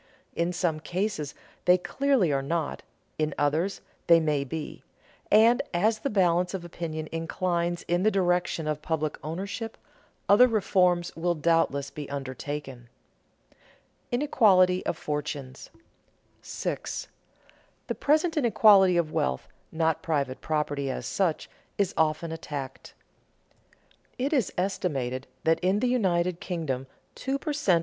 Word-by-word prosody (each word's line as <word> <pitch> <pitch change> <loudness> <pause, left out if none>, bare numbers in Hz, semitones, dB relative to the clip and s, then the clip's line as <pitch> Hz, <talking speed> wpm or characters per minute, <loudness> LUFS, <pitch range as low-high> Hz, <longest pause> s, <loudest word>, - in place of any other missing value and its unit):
In 170 +1 0
some 170 -3 -1
cases 170 -2 -3 0.3
they 180 0 +6
clearly 250 - +1
are 135 - +1
not, 160 +2 -2 0.4
in 155 -1 0
others 155 +7 0 0.3
they 170 -1 +7
may 150 -3 0
be; 150 +3 -6 0.5
and 225 +3 +6
as 215 +5 +2
the 275 - -2
balance 180 -2 +2
of 175 -2 -6
opinion 160 -2 -5
inclines 170 +1 -1
in 175 +1 0
the 215 - +4
direction 180 -4 0
of 150 -1 -2
public 155 -1 -2
ownership, 200 +8 -5 0.5
other 210 +5 +7
reforms 180 -6 +2
will 175 +1 0
doubtless 155 -3 +1
be 150 -2 -7
undertaken. 135 -2 -6 0.6
[Sidenote: - - -33 0.6
Inequality 185 -9 +4
of 165 - -1
fortunes] 145 -3 -5 0.7
6. - - -4 0.8
The - - -2
present 315 +3 +2
inequality 205 - +5
of 165 -3 0
wealth, 65 0 -1 0.2
not 160 -1 0
private 140 -5 -1
property 145 -3 -1
as 130 - -4
such, 180 -5 0 0.3
is 200 -3 +1
often 160 +1 +1
attacked. 140 -4 -7 1.2
It 275 +5 -1
is 255 -9 +1
estimated 140 -9 -2 0.2
that 160 0 +3
in 185 +3 +1
the 250 - +1
United 180 -8 +1
Kingdom 140 -8 -3 0.3
two 270 +1 -2
per 300 +2 -3
cent. 200 - +3
170 Hz, 130 wpm, -27 LUFS, 150-195 Hz, 1.2 s, they